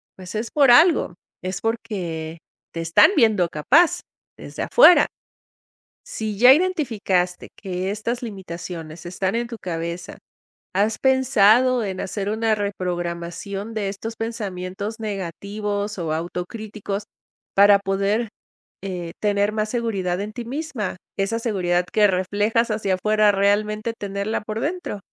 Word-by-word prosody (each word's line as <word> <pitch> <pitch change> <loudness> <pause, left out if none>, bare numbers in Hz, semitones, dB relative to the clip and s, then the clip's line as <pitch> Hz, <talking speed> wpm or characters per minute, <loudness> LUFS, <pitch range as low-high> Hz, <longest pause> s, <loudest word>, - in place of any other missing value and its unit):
pues, 185 +1 -9
es 220 +1 -2
por 280 -4 +5
algo, 310 - +5 0.3
es 185 0 -4
porque 180 -9 -3 0.4
te 165 - -5
están 165 - +5
viendo 215 - +4
capaz, 285 - +3 0.4
desde - - -6
afuera. 415 -7 +7 1.0
Si 215 -2 -4
ya 250 +4 +9
identificaste 225 - 0
que 185 -1 -4
estas 230 +4 -3
limitaciones 170 -6 -7
están 190 +3 -2
en 235 +1 -1
tu 235 - -6
cabeza, 170 0 -5 0.6
¿has 210 +3 +1
pensado 255 -2 +4
en 190 -2 -4
hacer 195 +1 -3
una 220 0 +1
reprogramación 185 +1 -4
de 210 -3 -2
estos 225 +3 -6
pensamientos 205 -1 -5
negativos 205 +1 -4
o 165 -3 -2
autocríticos 195 +5 -5 0.5
para 200 0 +7
poder, 200 +3 -1 0.5
eh, 180 -3 -5
tener 205 0 +1
más 215 0 -1
seguridad 200 -7 -1
en 210 +1 -5
ti 240 +1 -6
misma, 255 - -4 0.2
esa 200 +4 0
seguridad 180 -6 0
que 210 - +4
reflejas 205 +5 +1
hacia 200 -3 0
fuera, 215 +1 +3
realmente 210 +3 +1
tenerla 200 +2 -3
por 215 +1 -5
dentro? 315 - -3
205 Hz, 125 wpm, -22 LUFS, 185-225 Hz, 1.0 s, ya